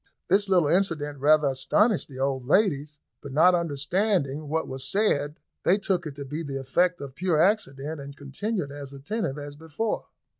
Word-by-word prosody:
This 200 +2 +3
little 180 -5 +4
incident 150 -5 0
rather 150 +1 +4
astonished 150 - +2
the 130 - -10
old 130 -1 -1
ladies, 150 -5 +2 0.2
but 140 - -8
not 160 +6 +5
understanding 160 -1 0
what 160 +1 -1
was 130 0 -6
said, 145 -3 +1 0.3
they 185 - +4
took 185 -5 -1
it 145 - -7
to 140 0 -6
be 150 +4 -4
the 140 -4 -4
effect 175 +7 +1
of 140 -2 -7
pure 165 +1 0
accident, 155 -6 0
and 140 0 -10
continued 150 - -3
as 140 -1 -8
attentive 140 +2 -3
as 145 0 -7
before. 160 +8 -3
150 Hz, 175 wpm, -26 LUFS, 140-180 Hz, 0.3 s, not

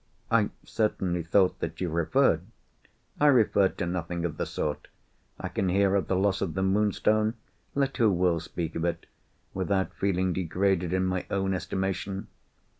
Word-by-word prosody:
"I - - +3 0.2
certainly 95 -5 0
thought 90 +3 +2
that 80 -1 -4
you 90 - -1
referred——" 85 - +2 0.8
"I 150 - +5
referred 110 -7 +4
to - - -1
nothing 85 0 -3
of 85 - -3
the - - -2
sort. 75 -1 -3 0.5
I - - -3
can 95 - -1
hear 100 +1 +3
of 100 -2 +1
the 95 - +1
loss 95 +1 +1
of 90 -4 -2
the 95 - 0
Moonstone, 105 +2 +2 0.4
let 140 -1 0
who 115 -5 +4
will 90 -2 +2
speak 80 0 -5
of 80 - -3
it, 85 0 -2 0.5
without 95 +1 0
feeling 95 -2 0
degraded 90 0 0
in 95 0 +1
my 95 -1 -2
own 95 -1 0
estimation. 95 +1 -3
95 Hz, 165 wpm, -28 LUFS, 85-100 Hz, 0.8 s, I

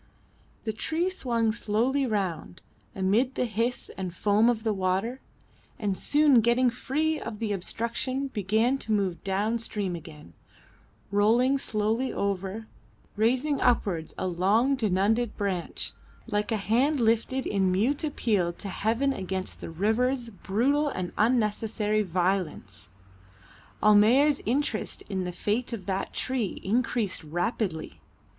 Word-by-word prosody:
The 220 - -2
tree 325 - -1
swung 235 -10 0
slowly 235 +5 0
round, 180 - -3 0.3
amid 215 +8 +1
the - - +1
hiss 235 +2 -2
and 185 -2 -5
foam 210 +4 +3
of 225 -2 0
the 220 -2 +1
water, 195 +7 -1 0.6
and 205 -3 -1
soon 290 +1 +4
getting 240 +2 +3
free 305 +6 -1
of 225 -2 -6
the 215 -1 -2
obstruction 235 +7 -2
began 220 +4 +1
to 220 - -5
move 195 -5 0
down 210 +4 0
stream 205 -5 -3
again, 155 - -11 0.8
rolling 235 +7 +3
slowly 220 +3 -1
over, 200 +2 -2 0.5
raising 255 +7 +1
upwards 180 -9 +1
a - - -2
long, 200 +9 +2
denuded 220 +1 +1
branch, 195 -4 -3 0.3
like 210 -2 -1
a 220 - +2
hand 250 +9 +2
lifted 230 +3 +1
in 190 -2 +1
mute 240 - +1
appeal 215 - 0
to 195 - -6
heaven 230 +8 0
against 190 -2 -4
the - - -6
river's 230 +8 0
brutal 245 +9 +1
and 185 -8 -4
unnecessary 215 -2 +1
violence. 180 - -2 0.9
Almayer's 235 +8 +5
interest 245 -2 -1
in 190 -2 -1
the 180 - -3
fate 220 +7 -2
of 200 -5 -5
that 195 -1 -2
tree 250 -6 -2
increased 225 -2 0
rapidly. 175 +2 -3
220 Hz, 130 wpm, -27 LUFS, 195-245 Hz, 0.9 s, Almayer's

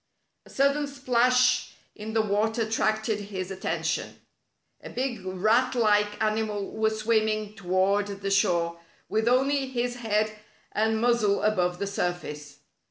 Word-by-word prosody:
A - - -16
sudden 280 +2 +1
splash 250 -2 +2 0.2
in 215 +1 -7
the 220 -1 +2
water 215 +2 0
attracted 220 0 0
his 195 -2 -5
at 190 0 -8
tention. - - -2 0.7
A - - -9
big 245 -5 -3
rat 215 +8 +1
like 210 -3 +2
animal 215 -2 -1
was 220 0 0
swimming 215 -1 +1
toward 195 +1 +1
the 200 -1 -4
shore, 170 -4 +1 0.3
with 220 +1 0
only 270 +2 +2
his 245 -1 -2
head 215 -2 0 0.4
and 220 +1 +1
muzzle 230 -4 +2
above 180 -4 +1
the 200 - -2
surface. 175 -7 -4
215 Hz, 135 wpm, -27 LUFS, 200-235 Hz, 0.7 s, splash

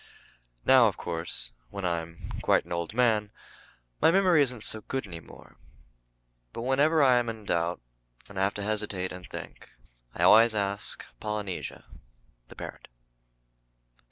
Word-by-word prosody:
Now 130 -3 +7
of 100 - -3
course, 85 -7 0 0.2
when 100 +7 -6
I 85 -1 0
am 85 0 -11
quite - - +2
an - - -16
old 85 +4 -3
man, 110 -4 +2 0.7
my - - +6
memory 180 -3 +4
isn't 125 -5 0
so 110 - +1
good 130 +3 -4
any 85 -4 -8
more. - - -16 1.0
But 115 - -5
whenever 145 +4 +3
I 130 -2 +5
am 120 -1 -2
in 110 -2 -8
doubt 85 -4 -1 0.5
and 100 - -13
have 100 +1 +1
to 105 - -5
hesitate 105 -3 -2
and 90 0 -9
think, - - -10 0.5
I - - -1
always 115 +1 +6
ask 100 -1 +2
Polynesia, 105 -3 -5 0.6
the - - -14
parrot. - - -9
105 Hz, 150 wpm, -28 LUFS, 90-125 Hz, 1.0 s, Now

